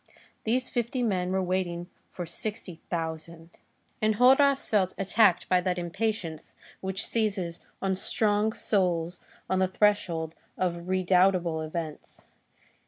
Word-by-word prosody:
These 250 +3 +1
fifty 245 +1 -1
men 185 -5 0
were 190 0 +1
waiting 175 -1 -2 0.2
for 175 - -6
sixty 185 0 -5
thousand. 165 0 -5 0.5
Enjolras 260 +6 +4
felt 190 -4 +1
attacked 195 -1 +3
by 180 -1 +3
that 180 0 -1
impatience 175 -2 -3 0.2
which 190 +2 -1
seizes 195 -7 0 0.2
on 190 -1 +1
strong 210 +2 +1
souls 175 -5 0 0.3
on 190 - +1
the 190 - +3
threshold 185 -5 +1 0.2
of 175 -1 -2
redoubtable 185 -2 +2
events. 155 -1 -6
185 Hz, 115 wpm, -28 LUFS, 170-210 Hz, 0.5 s, Enjolras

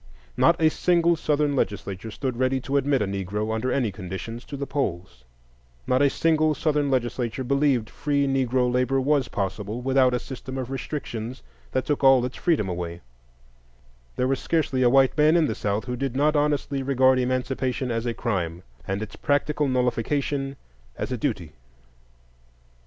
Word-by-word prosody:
Not 170 0 +4
a 160 -1 +5
single 170 0 +3
Southern 150 -2 0
legislature 100 -2 -2
stood 130 +3 -3
ready 130 +1 +1
to 135 +3 -3
admit 140 -3 +2
a - - 0
Negro, 100 +3 -3
under 120 +3 -1
any 125 -6 +1
conditions, 95 +6 -7
to 140 - -7
the 140 - -3
polls; 90 - -3 0.6
not 130 +1 +2
a 140 - +5
single 155 0 +2
Southern 150 -1 +1
legislature 120 -1 -1
believed 135 -3 +2
free 145 -1 0
Negro 130 -2 +1
labor 125 +2 +2
was 135 -1 +2
possible 105 +3 -3
without 130 0 +3
a - - 0
system 130 +1 -7
of 130 -1 -4
restrictions 130 -3 -5 0.3
that 130 - -1
took 145 -1 -1
all 135 -2 +6
its 125 - -5
freedom 155 - +1
away; 85 -1 -4 1.1
there 125 - +1
was 135 0 0
scarcely 150 -6 0
a 125 - +5
white 135 +1 +4
man 155 +2 +4
in 165 - +4
the 110 - -1
South 105 0 -2
who 125 0 -3
did 130 0 -3
not 150 +3 +2
honestly 145 -2 0
regard 130 -1 +3
Emancipation 130 0 -1
as 115 +1 -2
a 120 - 0
crime, 90 -7 -2 0.2
and 100 +2 -2
its 110 - -9
practical 145 +1 0
nullification 135 +2 0 0.4
as - - -4
a - - 0
duty. 105 - -2
130 Hz, 170 wpm, -25 LUFS, 115-140 Hz, 1.1 s, all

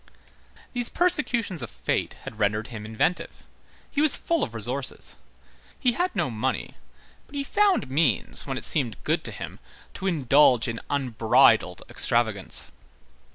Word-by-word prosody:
These 245 -1 0
persecutions 250 - +1
of 115 - -5
fate - - -2
had 110 - -9
rendered 105 +2 0
him 110 -3 -7
inventive. 110 +11 -2 0.5
He 290 - 0
was 310 -2 +6
full 335 -1 -1
of 115 - -3
resources. 125 +5 -3 0.6
He 250 - +3
had 360 +8 -1
no 130 - 0
money, 120 +4 -2 0.5
but 285 - -14
he 280 - -1
found 400 - +2
means, 135 - +2
when - - -3
it - - -2
seemed 125 -9 0
good - - 0
to - - -2
him, - - -8 0.3
to 195 - -4
indulge 140 -6 +4
in 115 -1 -3
"unbridled 125 -6 +3
extravagance." 110 -5 0
130 Hz, 145 wpm, -25 LUFS, -, 0.6 s, was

